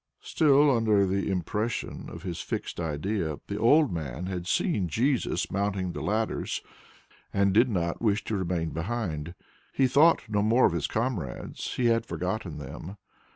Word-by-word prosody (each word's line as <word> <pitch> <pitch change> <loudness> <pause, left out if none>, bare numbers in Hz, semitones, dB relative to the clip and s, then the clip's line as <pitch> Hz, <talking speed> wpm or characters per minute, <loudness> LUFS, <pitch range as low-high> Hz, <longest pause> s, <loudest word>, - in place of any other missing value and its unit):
Still 145 -2 +4
under 110 -3 +3
the 95 +1 -1
impression 105 +5 -2
of - - -9
his 90 -3 -4
fixed - - -4
idea, 80 0 -2
the 100 - -4
old 145 +6 +5
man 80 0 -4
had 90 -2 -4
seen 105 - +1
Jesus 125 - 0
mounting 100 -2 -1
the - - -6
ladders 110 +2 -1 0.7
and 100 -1 +2
did 115 +5 +5
not 85 -5 -1
wish 110 -2 +1
to 110 - -2
remain 85 -3 -1
behind. 85 -3 -3 0.4
He 135 - +2
thought 145 +6 +5
no 105 -1 +1
more 115 +5 +4
of - - +3
his 85 -4 -1
comrades; 110 - -3
he 125 - 0
had 115 -1 +2
forgotten 90 -2 -3
them. 75 +7 -8
100 Hz, 155 wpm, -28 LUFS, 85-115 Hz, 0.7 s, old